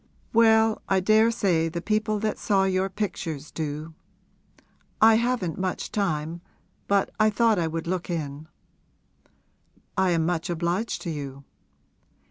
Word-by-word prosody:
'Well, 220 Hz, -1 st, +4 dB
I 195 Hz, -, +3 dB
daresay 200 Hz, -5 st, +3 dB
the 170 Hz, +1 st, -4 dB
people 215 Hz, +3 st, 0 dB
that 215 Hz, -1 st, -1 dB
saw 195 Hz, -2 st, +2 dB
your 190 Hz, 0 st, +1 dB
pictures 165 Hz, -7 st, -4 dB
do! 155 Hz, +1 st, -5 dB, 1.1 s
I 225 Hz, +1 st, +7 dB
haven't 225 Hz, -8 st, 0 dB
much 185 Hz, -1 st, -3 dB
time, 165 Hz, -4 st, -2 dB, 0.5 s
but 200 Hz, -1 st, +2 dB
I 215 Hz, 0 st, +5 dB
thought 220 Hz, -1 st, +2 dB
I 165 Hz, -, 0 dB
would 165 Hz, 0 st, -4 dB
look 180 Hz, +1 st, -3 dB
in.' 155 Hz, -3 st, -4 dB, 1.5 s
'I 190 Hz, -1 st, +3 dB
am 165 Hz, -2 st, +1 dB
much 170 Hz, 0 st, -1 dB
obliged 175 Hz, +6 st, -2 dB
to 170 Hz, -, -3 dB
you.' 140 Hz, -2 st, -6 dB
185 Hz, 130 wpm, -25 LUFS, 160-215 Hz, 1.5 s, I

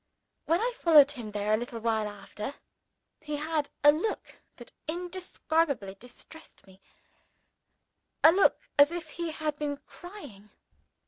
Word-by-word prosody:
When 335 Hz, +2 st, +2 dB
I 485 Hz, +3 st, 0 dB
followed 300 Hz, -4 st, +7 dB
him 240 Hz, -7 st, -7 dB
there 210 Hz, 0 st, -1 dB
a -, -, +4 dB
little 235 Hz, 0 st, -6 dB
while 220 Hz, -2 st, 0 dB
after, 210 Hz, +4 st, -7 dB, 0.6 s
he 300 Hz, 0 st, -5 dB
had 305 Hz, 0 st, -2 dB
a 295 Hz, -, +9 dB
look 355 Hz, +9 st, -3 dB, 0.2 s
that -, -, -13 dB, 0.2 s
indescribably 325 Hz, -, -2 dB
distressed 245 Hz, +9 st, -14 dB
me 190 Hz, 0 st, -19 dB, 1.4 s
a 320 Hz, -, +10 dB
look 385 Hz, +3 st, +2 dB
as 285 Hz, +2 st, +7 dB
if 345 Hz, -1 st, -6 dB
he 340 Hz, -1 st, -4 dB
had 305 Hz, -1 st, -3 dB
been 290 Hz, -1 st, -2 dB
crying. 285 Hz, -, -12 dB
295 Hz, 135 wpm, -29 LUFS, 220-330 Hz, 1.4 s, a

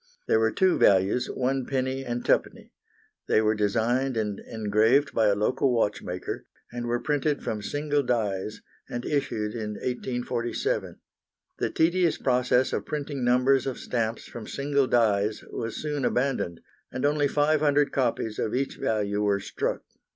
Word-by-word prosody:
There 110 Hz, -, +4 dB
were 110 Hz, 0 st, +3 dB
two 190 Hz, -2 st, +2 dB
values, 100 Hz, +6 st, +3 dB
1d. 130 Hz, 0 st, -1 dB
and 120 Hz, 0 st, -2 dB
2d. -, -, 0 dB, 0.6 s
They -, -, +4 dB
were 110 Hz, 0 st, +3 dB
designed 115 Hz, +5 st, +1 dB
and 105 Hz, -2 st, -2 dB
engraved 110 Hz, +5 st, +2 dB
by 110 Hz, -2 st, +3 dB
a 100 Hz, -, +3 dB
local 130 Hz, +6 st, +1 dB
watchmaker, 100 Hz, -6 st, -2 dB, 0.2 s
and 120 Hz, 0 st, -4 dB
were 120 Hz, 0 st, 0 dB
printed 150 Hz, +1 st, 0 dB
from 105 Hz, -1 st, -3 dB
single 145 Hz, +6 st, 0 dB
dies, 110 Hz, -5 st, -2 dB, 0.3 s
and 120 Hz, 0 st, -4 dB
issued 115 Hz, -7 st, -1 dB
in 110 Hz, -2 st, -4 dB
1847. 125 Hz, -1 st, -2 dB, 0.6 s
The -, -, 0 dB
tedious 170 Hz, 0 st, +2 dB
process 125 Hz, 0 st, +2 dB
of -, -, -2 dB
printing 145 Hz, -3 st, -3 dB
numbers 125 Hz, +2 st, +3 dB
of 130 Hz, -, -3 dB
stamps 115 Hz, -2 st, -2 dB
from 115 Hz, -3 st, -9 dB
single 140 Hz, -1 st, 0 dB
dies 105 Hz, -3 st, +2 dB
was 115 Hz, -1 st, -4 dB
soon 150 Hz, -2 st, -2 dB
abandoned, 125 Hz, -10 st, 0 dB, 0.3 s
and 130 Hz, -, -2 dB
only 145 Hz, 0 st, +2 dB
500 145 Hz, 0 st, +2 dB
copies 115 Hz, -4 st, -1 dB
of 110 Hz, -, -1 dB
each 135 Hz, +1 st, -2 dB
value 105 Hz, -2 st, 0 dB
were 100 Hz, -1 st, +2 dB
struck. 100 Hz, -, -3 dB
120 Hz, 145 wpm, -26 LUFS, 110-140 Hz, 0.6 s, There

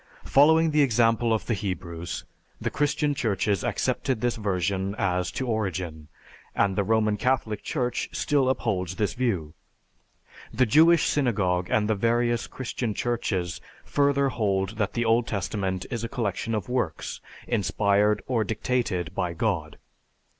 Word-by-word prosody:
Following 160 Hz, +3 st, +5 dB
the 150 Hz, 0 st, +3 dB
example 115 Hz, -2 st, +3 dB
of 110 Hz, -, 0 dB
the 120 Hz, -, 0 dB
Hebrews, 90 Hz, -5 st, -4 dB, 0.3 s
the -, -, -2 dB
Christian 145 Hz, 0 st, +1 dB
Churches 105 Hz, -6 st, 0 dB
accepted 130 Hz, -4 st, -1 dB
this 120 Hz, +1 st, 0 dB
version 95 Hz, -1 st, -1 dB
as 90 Hz, -3 st, 0 dB
to 130 Hz, -, -2 dB
origin, 95 Hz, -9 st, -3 dB, 0.5 s
and 100 Hz, -1 st, +2 dB
the 100 Hz, -, +1 dB
Roman 110 Hz, 0 st, +2 dB
Catholic 120 Hz, -5 st, 0 dB
Church 125 Hz, -1 st, -2 dB
still 140 Hz, -4 st, +1 dB
upholds 95 Hz, -8 st, -1 dB
this 105 Hz, +1 st, 0 dB
view. 95 Hz, -12 st, -1 dB, 1.0 s
The 125 Hz, +3 st, +2 dB
Jewish 160 Hz, +7 st, +5 dB
Synagogue 95 Hz, -10 st, +1 dB
and 105 Hz, -1 st, +2 dB
the 110 Hz, -, +2 dB
various 120 Hz, +2 st, +1 dB
Christian 120 Hz, -3 st, -4 dB
Churches 95 Hz, -8 st, -2 dB, 0.2 s
further 140 Hz, -1 st, +2 dB
hold 100 Hz, -3 st, -1 dB
that 100 Hz, -, 0 dB
the 120 Hz, -1 st, 0 dB
Old 115 Hz, +1 st, +3 dB
Testament 95 Hz, -2 st, -2 dB
is 120 Hz, -2 st, -3 dB
a 115 Hz, -, -3 dB
collection 115 Hz, -2 st, -2 dB
of 105 Hz, -, -3 dB
works 125 Hz, -11 st, -2 dB, 0.3 s
inspired 105 Hz, -2 st, +2 dB
or 120 Hz, -4 st, +1 dB
dictated 105 Hz, -6 st, -1 dB
by 90 Hz, -2 st, -2 dB
God. 85 Hz, -5 st, -2 dB
110 Hz, 140 wpm, -26 LUFS, 95-125 Hz, 1.0 s, Following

